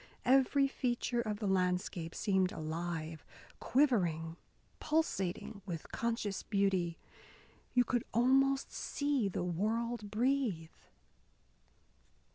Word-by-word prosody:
Every 270 Hz, +2 st, +4 dB
feature 245 Hz, -2 st, -1 dB
of 215 Hz, -2 st, -3 dB
the 210 Hz, -, -4 dB
landscape 180 Hz, -3 st, 0 dB
seemed 190 Hz, -3 st, +2 dB
alive, 160 Hz, -1 st, -4 dB, 0.4 s
quivering, 175 Hz, -, +2 dB, 0.4 s
pulsating 210 Hz, -, -1 dB
with 165 Hz, -4 st, -6 dB
conscious 230 Hz, -4 st, -2 dB
beauty. 190 Hz, -5 st, 0 dB, 0.8 s
You 245 Hz, -, +6 dB
could 245 Hz, 0 st, 0 dB
almost 270 Hz, +3 st, +3 dB
see 285 Hz, -7 st, -1 dB
the 180 Hz, -, -2 dB
world 215 Hz, +5 st, -1 dB
breathe. 220 Hz, -7 st, 0 dB
210 Hz, 90 wpm, -34 LUFS, 175-250 Hz, 0.8 s, You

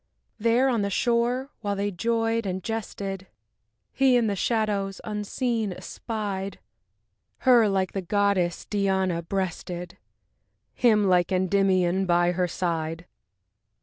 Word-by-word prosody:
There 235 Hz, +4 st, +3 dB
on 240 Hz, -5 st, +1 dB
the 200 Hz, -, 0 dB
shore, 240 Hz, +6 st, 0 dB
while 205 Hz, -2 st, -2 dB
they 200 Hz, +1 st, -1 dB
joyed 225 Hz, +2 st, 0 dB
and 185 Hz, 0 st, -3 dB
jested, 195 Hz, -4 st, -4 dB, 0.7 s
He 265 Hz, -2 st, +4 dB
in 235 Hz, -, +2 dB
the 205 Hz, -2 st, 0 dB
shadows, 205 Hz, -2 st, -1 dB
unseen, 215 Hz, +1 st, -2 dB
espied 200 Hz, -2 st, -5 dB, 0.8 s
Her, 240 Hz, -5 st, +5 dB
like 190 Hz, -2 st, 0 dB
the 195 Hz, -, -2 dB
goddess 190 Hz, -2 st, +1 dB
Diana 190 Hz, -4 st, 0 dB
breasted, 180 Hz, -1 st, -4 dB, 0.7 s
Him, 215 Hz, -4 st, +3 dB
like 180 Hz, -2 st, +3 dB
Endymion 185 Hz, 0 st, +2 dB
by 175 Hz, 0 st, +3 dB
her 180 Hz, 0 st, 0 dB
side. 165 Hz, -1 st, -3 dB
200 Hz, 115 wpm, -26 LUFS, 185-225 Hz, 0.8 s, Her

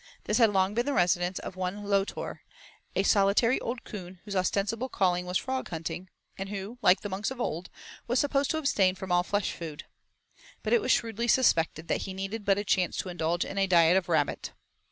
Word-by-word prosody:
This -, -, 0 dB
had 225 Hz, -3 st, +6 dB
long 190 Hz, 0 st, +2 dB
been 240 Hz, +4 st, 0 dB
the 285 Hz, -, +1 dB
residence 175 Hz, -2 st, +2 dB
of -, -, -6 dB
one 185 Hz, +2 st, -3 dB
Lotor, 200 Hz, -1 st, -1 dB, 0.6 s
a 195 Hz, -, +2 dB
solitary 200 Hz, +5 st, +3 dB
old 235 Hz, +1 st, -4 dB
coon 185 Hz, -4 st, -9 dB
whose 205 Hz, -2 st, -5 dB
ostensible 205 Hz, +6 st, 0 dB
calling 180 Hz, -4 st, +1 dB
was 180 Hz, +1 st, +1 dB
frog 260 Hz, 0 st, -3 dB
hunting, 165 Hz, +2 st, -5 dB, 0.3 s
and 195 Hz, 0 st, -4 dB
who, 205 Hz, +4 st, -6 dB
like 190 Hz, -2 st, +5 dB
the -, -, -4 dB
monks 195 Hz, +2 st, -2 dB
of 265 Hz, -1 st, -7 dB
old, 175 Hz, -6 st, -3 dB, 0.4 s
was 245 Hz, +2 st, +1 dB
supposed 280 Hz, 0 st, +1 dB
to 315 Hz, -, 0 dB
abstain 200 Hz, -11 st, +2 dB
from 190 Hz, -1 st, -7 dB
all 175 Hz, 0 st, +4 dB
flesh 205 Hz, +2 st, -1 dB
food. 160 Hz, -3 st, -7 dB, 0.8 s
But -, -, 0 dB
it 475 Hz, -, +5 dB
was -, -, +1 dB
shrewdly 230 Hz, 0 st, 0 dB
suspected 165 Hz, -, +2 dB
that -, -, 0 dB
he 190 Hz, -, -5 dB
needed 195 Hz, +3 st, -4 dB
but 195 Hz, -1 st, +3 dB
a 205 Hz, -, -1 dB
chance 185 Hz, -3 st, +1 dB
to 185 Hz, -, -3 dB
indulge 170 Hz, -1 st, -1 dB
in 195 Hz, -, -4 dB
a 195 Hz, -, +3 dB
diet 170 Hz, -1 st, +5 dB
of 190 Hz, -2 st, +1 dB
rabbit. 155 Hz, -4 st, 0 dB
195 Hz, 210 wpm, -28 LUFS, 180-225 Hz, 0.8 s, had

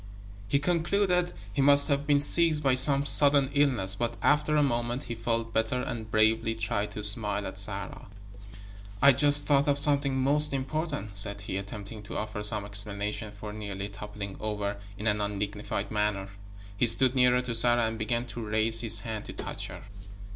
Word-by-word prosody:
He 125 Hz, -, +1 dB
concluded 180 Hz, +3 st, 0 dB, 0.2 s
he 140 Hz, -, -1 dB
must 140 Hz, +1 st, +6 dB
have 140 Hz, -1 st, -1 dB
been 145 Hz, -1 st, +3 dB
seized 155 Hz, +1 st, +4 dB
by 135 Hz, -2 st, +2 dB
some 140 Hz, +2 st, +4 dB
sudden 140 Hz, -1 st, +4 dB
illness, 130 Hz, -10 st, +1 dB
but 120 Hz, +3 st, -3 dB
after 150 Hz, +1 st, +2 dB
a 150 Hz, -, +3 dB
moment 120 Hz, 0 st, -2 dB
he 120 Hz, -, -6 dB
felt 115 Hz, 0 st, -3 dB
better 110 Hz, +3 st, -1 dB
and 110 Hz, -3 st, -6 dB
bravely 110 Hz, +1 st, +1 dB
tried 110 Hz, -2 st, -3 dB
to 105 Hz, -, -6 dB
smile 105 Hz, -1 st, +1 dB
at -, -, -5 dB
Sarah. -, -, -2 dB, 0.9 s
"I 140 Hz, -, +6 dB
I -, -, +8 dB
just 145 Hz, +2 st, +3 dB
thought 145 Hz, 0 st, +2 dB
of 140 Hz, -1 st, +1 dB
something 140 Hz, -2 st, +2 dB
most 145 Hz, +2 st, +3 dB
important," 135 Hz, -6 st, -4 dB
said 100 Hz, 0 st, -1 dB
he, 95 Hz, -, -6 dB
attempting 100 Hz, +2 st, -7 dB
to 100 Hz, -, -8 dB
offer 105 Hz, -1 st, -5 dB
some 105 Hz, -1 st, +2 dB
explanation 105 Hz, +1 st, -3 dB
for 105 Hz, 0 st, -8 dB
nearly 100 Hz, -2 st, -6 dB
toppling 100 Hz, -1 st, -9 dB
over 105 Hz, -1 st, -4 dB, 0.2 s
in 105 Hz, -, -7 dB
an 105 Hz, -1 st, 0 dB
undignified 105 Hz, 0 st, -4 dB
manner. 105 Hz, -2 st, -2 dB, 0.5 s
He 120 Hz, +4 st, +1 dB
stood 130 Hz, +2 st, +6 dB
nearer 125 Hz, -1 st, +2 dB
to 125 Hz, -2 st, -4 dB
Sarah 120 Hz, 0 st, +2 dB
and 110 Hz, 0 st, -4 dB
began 120 Hz, +2 st, -2 dB
to 120 Hz, -, -7 dB
raise 110 Hz, +1 st, +1 dB
his 115 Hz, -2 st, +4 dB
hand 110 Hz, -2 st, -6 dB
to -, -, -9 dB
touch -, -, -6 dB
her. -, -, -11 dB
115 Hz, 185 wpm, -27 LUFS, 105-140 Hz, 0.9 s, I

